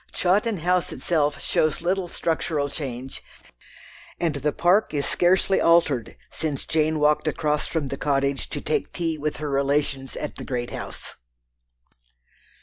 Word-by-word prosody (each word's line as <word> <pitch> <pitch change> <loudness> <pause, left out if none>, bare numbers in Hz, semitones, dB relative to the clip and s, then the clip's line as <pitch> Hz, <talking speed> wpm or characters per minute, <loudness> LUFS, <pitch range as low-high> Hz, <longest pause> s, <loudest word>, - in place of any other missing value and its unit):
Chawton 205 +4 +1
House 180 +1 +1
itself 150 -4 0
shows 155 +1 0
little 185 +1 0
structural 160 -4 -1
change, 130 -3 -6 1.0
and 165 -3 +1
the 150 +2 0
park 175 +2 +2
is 140 - 0
scarcely 185 +2 +3
altered 160 -8 +3 0.2
since 150 -4 -3
Jane 155 0 +1
walked 150 +1 +2
across 150 -1 0
from 155 -5 -2
the 140 - -4
Cottage 140 -1 0
to - - -4
take 445 - -1
tea 165 -3 -2
with 150 +1 -2
her 150 -1 -3
relations 140 -1 0
at - - -5
the - - -6
great 120 -2 -3
house. - - -7
150 Hz, 145 wpm, -24 LUFS, 140-170 Hz, 1.0 s, scarcely